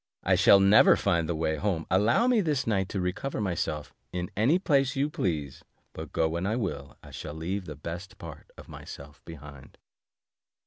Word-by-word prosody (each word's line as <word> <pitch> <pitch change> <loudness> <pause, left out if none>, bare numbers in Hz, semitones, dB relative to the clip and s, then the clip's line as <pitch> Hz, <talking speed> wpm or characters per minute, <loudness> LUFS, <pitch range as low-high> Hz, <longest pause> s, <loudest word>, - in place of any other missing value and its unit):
I - - +2
shall 100 - +6
never 100 +2 +6
find 85 -1 0
the 85 - -1
way 80 0 -1
home; 90 -2 -2
allow 110 - +3
me 245 -3 +3
this 150 -7 -1
night 95 -4 0
to 100 - -3
recover 95 +10 -3
myself, 85 -6 -3 0.2
in 90 -1 -4
any 120 - +3
place 140 -7 +1
you 140 +2 0
please, 80 - -3 0.3
but - - -8
go 80 - +1
when 85 +4 -3
I 110 - 0
will, 75 - -4
I - - -13
shall 75 - -7
leave 90 +4 -4
the 75 - -8
best 85 +5 -8
part - - -11
of - - -12
myself 70 +1 -11
behind." 75 -4 -12
90 Hz, 185 wpm, -27 LUFS, 80-110 Hz, 0.3 s, shall